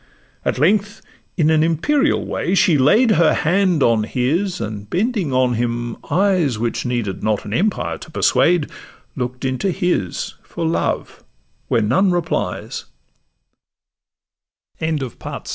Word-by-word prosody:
At - - -1
length, 205 - +1 0.3
in 160 -2 +3
an 155 -1 +4
imperial 270 - +1
way, 180 - -1
she 185 -3 +4
laid 215 - +4
Her 170 -6 +4
hand 180 -2 +2
on 115 -2 +3
his, 160 - -1
and 105 -2 -6
bending 200 - 0
on 130 -1 +2
him 120 0 -2
eyes 180 - +2
Which 115 +2 -2
needed 115 -6 -2
not 110 -1 -1
an 105 - -5
empire 200 - -1
to - - -11
persuade, 165 +1 +2 0.4
Look'd 125 0 -4
into 130 +9 -1
his 180 - -1
for 165 - -5
love, 160 - -2 0.4
where 115 - +2
none 185 - +3
replies: 160 - -2 1.9
Her 160 0 -1
br 135 -7 -4
155 Hz, 130 wpm, -19 LUFS, 120-185 Hz, 1.9 s, an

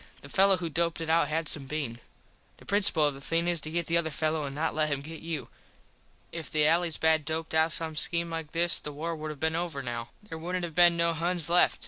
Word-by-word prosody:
The - - -12
fello 195 0 +4
who 170 -1 -4
doped 165 +1 -1
it 160 -1 -2
out 165 -2 +3
had 155 +1 -2
some 140 -3 -1
bean. 135 -6 -4 0.6
The - - -18
principul 195 -6 +6
of 145 - -2
the 135 - -11
thing 165 +4 0
is 170 -2 0
to 155 - -6
get 170 +1 -2
the 170 +1 +1
other 165 -1 -1
fello 155 0 -2
an 140 0 -7
not 160 +2 -1
let 155 0 0
him 140 -1 -2
get 160 +2 -9
you. 165 -2 -5 0.8
If 165 -2 -6
the 155 -1 +2
allys 165 +1 +3
bad 160 -1 +3
doped 160 +2 -3
out 160 +1 +3
some 160 -1 -3
skeme 170 +2 +2
like 165 -2 -5
this 170 +2 +1
the 150 - -7
war 165 +3 -4
would 155 0 -6
have 150 -2 -8
been 160 +1 -1
over 165 -5 -3
now. 120 -1 -5
There 165 -6 -8
wouldnt 180 +2 -3
have 170 -2 -4
been 175 +1 +5
no 170 0 +2
Huns 170 0 -1
left. 175 - +4
160 Hz, 255 wpm, -28 LUFS, 155-170 Hz, 0.8 s, principul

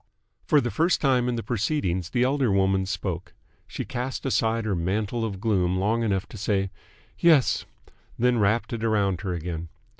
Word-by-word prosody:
For 150 - +5
the 120 -3 -1
first 170 +3 +2
time 125 -3 +2
in 120 - -1
the 115 - -3
proceedings 95 - -1
the 120 - +1
elder 130 -3 +2
woman 95 -1 +2
spoke. - - -4 0.3
She - - -5
cast 125 +3 -4
aside 115 -3 +1
her 105 - 0
mantle 100 +6 -1
of 100 -4 -3
gloom 95 -4 +1
long 110 +5 +1
enough 100 -4 0
to - - -9
say 95 -2 0 0.5
"Yes," 160 -6 +4 0.5
then 125 0 +2
wrapped 110 +4 +1
it 115 - -3
round 100 -5 +1
her 95 -3 -2
again. 85 0 -5
110 Hz, 175 wpm, -25 LUFS, 95-120 Hz, 0.5 s, For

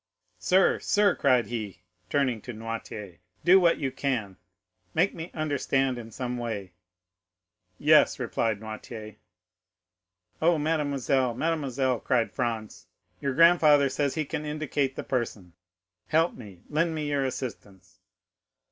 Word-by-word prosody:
Sir, 190 +1 +3
sir," 205 -2 +3
cried 125 -5 +3
he, 105 -3 -6 0.3
turning 130 -6 +1
to 120 - -7
Noirtier, 110 -4 -7 0.3
"do 185 +2 +8
what 170 -2 +4
you 135 -3 -2
can—make 95 - -3
me 165 +2 -7
understand 135 -4 0
in 115 -1 -9
some 125 +2 -4
way!" 105 -6 -5 1.0
"Yes," 150 +1 +5
replied 115 -4 -1
Noirtier. 110 0 -8 1.2
"Oh, 165 +1 +4
mademoiselle, 140 -5 0
mademoiselle!" 135 -5 0
cried 120 -3 +1
Franz, 110 -3 -4 0.3
"your 140 -2 -2
grandfather 155 -4 +6
says 140 +1 -1
he 155 -2 -1
can 150 +1 -4
indicate 150 -3 -2
the - - -5
person. 110 -8 -3 0.5
Help 165 +2 +2
me,—lend 135 - -3
me 150 -1 -3
your 140 -1 +1
assistance!" 120 -7 -6
130 Hz, 120 wpm, -27 LUFS, 110-150 Hz, 1.2 s, do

